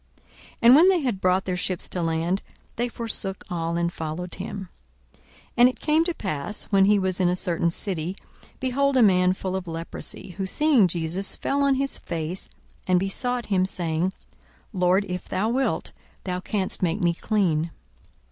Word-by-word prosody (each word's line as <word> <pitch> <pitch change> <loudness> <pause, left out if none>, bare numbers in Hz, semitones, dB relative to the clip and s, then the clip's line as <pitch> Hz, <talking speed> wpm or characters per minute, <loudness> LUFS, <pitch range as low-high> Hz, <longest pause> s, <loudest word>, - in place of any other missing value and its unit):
42:005:011 - - -33 0.3
And 240 +2 +9
when 340 +6 +7
they 375 -2 +4
had 235 -9 -2
brought 185 +1 +2
their 185 - -1
ships 180 0 -2
to 180 - -3
land, 165 +3 0 0.3
they 240 +1 0
forsook 215 -5 -4
all, 170 -1 -1
and 170 0 0
followed 165 +3 -5
him. 195 -1 -6 0.4
42:005:012 - - -29 0.4
And 245 +1 +7
it 255 - -8
came 310 +1 +3
to 345 - 0
pass, 190 +1 -1
when 195 -1 +5
he 205 +1 +5
was 190 -1 0
in 180 -2 +3
a 180 - +1
certain 170 -2 +1
city, 175 0 -3 0.4
behold 270 +1 +1
a 250 - +6
man 180 -2 +4
full 190 0 -4
of 190 -1 -4
leprosy: 165 +3 -6
who 190 - -1
seeing 275 -3 +4
Jesus 170 +3 -2
fell 280 +1 0
on 280 -1 +3
his 275 +1 -1
face, 170 +2 -4 0.4
and 180 -1 +4
besought 240 +5 -2
him, 185 -1 +3
saying, 175 -1 -1 0.6
Lord, 185 +1 +2
if 180 0 -5
thou 210 +4 0
wilt, 265 +3 0 0.3
thou 180 -1 -2
canst 190 0 -2
make 170 -2 +1
me 175 -1 +2
clean. 170 -5 0
185 Hz, 180 wpm, -25 LUFS, 175-225 Hz, 0.6 s, And